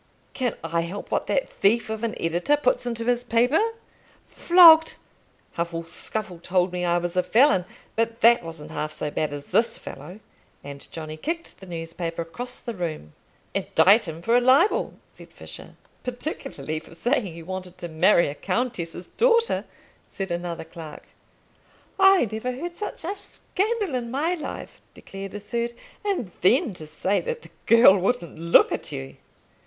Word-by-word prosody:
"Can 250 -4 -1
I 165 0 0
help 175 +5 -6
what - - 0
that - - 0
thief 225 +4 +1
of 220 0 -5
an 230 -1 -3
editor 175 - +1
puts 250 -3 +1
into 230 -1 -2
his 245 0 +1
paper? 245 +6 +2 0.7
Flogged! 330 -2 +7 0.6
Huffle 170 0 -2
Scuffle 190 -1 -4
told 180 +1 +1
me 180 0 -2
I 175 0 +2
was 175 +1 -3
a 180 - +4
felon, 200 -2 +4 0.3
but 230 +1 -1
that 235 -1 +6
wasn't 165 -2 -7
half 155 0 -3
so 150 -1 -3
bad 155 0 -1
as 145 0 -6
this 230 0 +2
fellow;" 160 +9 -10 0.4
and 140 0 -10
Johnny 155 -1 -7
kicked 330 - -5
the 190 - -12
newspaper 165 0 -4
across 245 +10 -7
the 235 - -6
room. 160 - -5 0.4
"Indict 200 +2 +4
him 165 +1 -7
for 230 +4 +2
a 245 - +5
libel," 270 - +3 0.2
said - - -13
Fisher. - - -12 0.3
"Particularly 250 - -4
for 160 +1 -16
saying 240 - 0
you 165 -1 -10
wanted 185 0 -6
to 175 - -6
marry 170 +3 +4
a 140 - -3
countess's 180 -4 -3
daughter," 465 -1 +2 0.4
said 195 -2 -5
another 170 0 -3
clerk. 160 -2 -11 0.9
"I 385 -8 +6
never 220 +4 -3
heard 340 +7 -6
such 420 - -5
a 390 +4 -2
scandal 410 - -2
in 240 -2 -2
my 295 +8 0
life," 340 - -7
declared 195 0 -9
a - - -4
third; 235 +3 -3 0.3
"and 370 - -2
then 225 +4 +3
to 155 -3 -8
say 185 +6 0
that 480 -1 -5
the - - -15 0.2
girl 230 -4 +8
wouldn't 185 -5 -2
look 170 +1 +5
at - - -4
you." 65 +1 -7
205 Hz, 165 wpm, -24 LUFS, 170-250 Hz, 0.9 s, girl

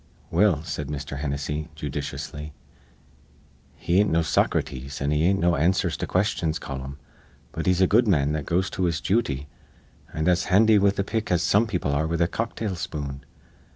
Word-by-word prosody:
"Well," 85 -3 +3
said 75 -3 -4
Mr. 70 -1 -5
Hennessy, 75 +2 -3
judiciously, 75 0 -5 1.2
"he 90 +3 +1
ain't 105 - +3
no 85 0 +2
Soc 80 - +2
rates 65 +2 -3
an' 70 +1 0
he 75 +2 +2
ain't 95 +2 +3
no 85 -1 +3
answers 85 +6 +1
to - - -3
questions 85 -4 0
colum; 65 +1 -6 0.5
but - - -4
he's 90 0 +3
a - - +7
good 115 +5 +3
man 75 -7 +2
that 75 -2 -3
goes 90 +3 0
to 95 - -1
his 85 -3 0
jooty, 80 - 0 0.7
an' 80 0 -2
as 90 -1 +3
handy 105 +3 +5
with 100 0 +2
a 100 - +1
pick 110 +1 -3
as 90 -1 +2
some 110 +3 +3
people 90 -8 -1
are 75 +3 0
with 85 0 -2
a 85 - +3
cocktail 110 -1 -3
spoon. 70 -5 -5
85 Hz, 185 wpm, -25 LUFS, 75-95 Hz, 1.2 s, a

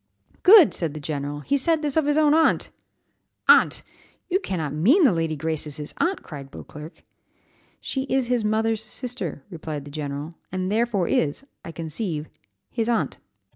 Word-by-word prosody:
'" - - -40
"Good!" 380 -3 +8
said 160 -4 -2
the - - -5
general, 145 0 -4
"he 280 - +1
said 320 +3 +1
this 290 -2 0
of 315 -2 +2
his 295 0 +2
own 300 -1 +4
aunt!" 320 +1 +2 0.8
"Aunt! - - +5 0.5
You 375 - +3
cannot 165 - -3
mean 240 - +4
that 265 - +6
Lady 165 -2 -1
Grace 155 0 -3
is 145 - -2
his 150 0 -7
aunt?" 370 +3 0
cried 140 -4 -9
Beauclerc. 150 +4 -11 0.8
"She 265 -1 -3
is 265 -2 0
his 245 -2 0
mother's 220 +1 0
sister," 220 - -5
replied 155 -4 -6
the 145 - -10
general, 145 +1 -5 0.2
"and 185 +1 -2
therefore 215 -5 +1
is, 150 - 0 0.2
I 165 - -7
conceive, 160 -1 -4 0.4
his 230 -1 -1
aunt." 235 - 0
185 Hz, 175 wpm, -24 LUFS, -, 0.8 s, Good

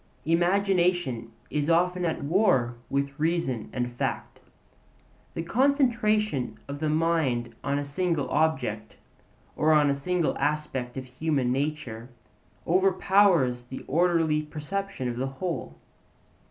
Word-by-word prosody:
Imagination 175 - +1 0.2
is 150 +1 0
often 180 +2 +2
at 160 -3 -2
war 140 - +2 0.2
with 140 +1 -2
reason 155 -8 -1
and 120 -1 -3
fact. - - -3 1.0
The 165 - -2
concentration 220 - +1
of 140 0 -6
the 155 0 0
mind 150 -7 +1
on 140 0 0
a 145 - -2
single 155 -1 -1
object, 130 -9 0 0.6
or 155 +1 +3
on 150 -2 +4
a - - +2
single 170 +4 0
aspect 145 -4 -2
of 130 - -4
human 130 0 -1
nature, 130 -4 -3 0.6
overpowers 185 -8 +3
the 130 +2 -8
orderly 165 -1 +2
perception 155 +1 -4
of 120 -1 -3
the 130 +2 -1
whole. 165 +6 -4
150 Hz, 120 wpm, -27 LUFS, 130-180 Hz, 1.0 s, on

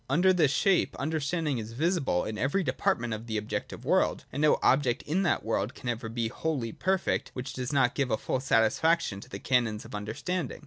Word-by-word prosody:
Under 180 +7 +4
this 165 -6 +3
shape 190 +6 +2
Understanding 150 -1 -1
is 110 +1 -7
visible 150 - +1
in 110 - -4
every 145 +9 +1
department 120 -4 0
of 110 +2 -6
the 110 -1 -2
objective 105 0 -4
world; - - +2
and 145 - -2
no 150 - +5
object 130 -2 +3
in 170 +6 0
that 180 - +1
world 110 0 -1
can 120 - -5
ever 115 -1 -3
be 115 0 -1
wholly 130 -1 -2
perfect 190 - 0
which 130 +1 -5
does 125 +1 -4
not 135 -4 +3
give 140 -3 0
full - - -1
satisfaction 130 +1 +2
to - - -13
the 100 - -6
canons 115 -2 0
of - - -11
understanding. 120 - -3
130 Hz, 195 wpm, -29 LUFS, 115-160 Hz, -, no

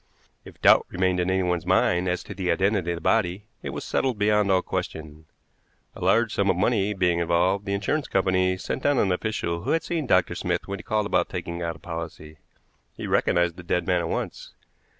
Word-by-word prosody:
If - - -14
doubt - - +6
remained 90 0 0
in 90 +1 0
anyone's 90 -3 0
mind 90 +1 +2
as 90 0 -2
to - - -8
the 90 -2 -3
identity 95 -2 +1
of 85 - -1
the - - -9
body, 100 0 +1 0.2
it - - -5
was - - -5
settled 130 -4 -1
beyond 105 -1 +2
all 95 -1 +3
question. 80 0 -5 0.7
A - - -8
large 115 -1 +3
sum 100 -1 +1
of 95 - +3
money 105 +1 +1
being 90 -2 +1
involved, 90 +4 +1
the 100 - 0
insurance 125 +9 -1
company 95 -1 +1
sent 130 - -4
down 145 0 +2
an 100 -5 +2
official 90 -3 -2
who 120 - -5
had 165 - +1
seen 160 -5 -2
Dr. 90 -4 +3
Smith 90 0 -2
when 100 0 -4
he - - -10
called 105 -1 0
about - - +1
taking 85 -1 -5
out 85 -1 -3
a - - -12
policy. 80 -3 -8 0.6
He - - -6
recognized 85 -1 +1
the 90 - -9
dead 90 0 -1
man 90 0 +2
at 85 - -3
once. - - -5
95 Hz, 210 wpm, -25 LUFS, 85-100 Hz, 0.7 s, doubt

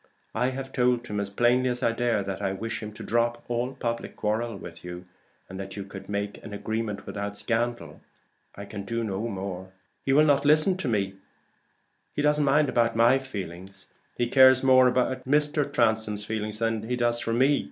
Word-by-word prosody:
I 125 +3 +1
have 135 0 -6
told 125 -1 +2
him 105 -3 -3
as 100 -1 -2
plainly 120 +5 +2
as 125 +1 -2
I 115 - +3
dare 115 -3 0
that 95 0 -5
I 95 -1 -1
wish 115 +3 -4
him 105 -1 -6
to - - -9
drop 120 +1 0
all 120 +2 -2
public 115 -2 -4
quarrel 110 +2 -1
with 85 -2 -10
you, 90 0 -7 0.4
and 95 +1 -8
that 95 -1 -6
you 100 - -4
could 95 0 -10
make 100 0 -3
an 105 -2 -7
arrangement 110 -1 -3
without 100 0 -5
scandal. 120 +2 -2 0.5
I 100 - -8
can 100 0 -7
do 115 +3 -2
no 105 +1 -2
more. 95 -2 -6 0.3
He 135 - 0
will 150 +3 +6
not 140 -2 +3
listen 155 +5 +5
to 185 - -3
me; 100 -5 0 1.0
he 145 - 0
doesn't 150 0 +3
mind 145 +1 +3
about 115 -3 +1
my 120 +4 +5
feelings. 95 -6 -8 0.3
He 120 - +1
cares 130 +1 +6
more 130 -1 +6
for 125 +1 +1
Mr. 145 +2 +1
Transome 110 -5 +1 0.4
than 110 0 -2
he 125 - +1
does 120 -1 +1
for 115 - -2
me. 135 +4 +3
115 Hz, 195 wpm, -26 LUFS, 100-130 Hz, 1.0 s, will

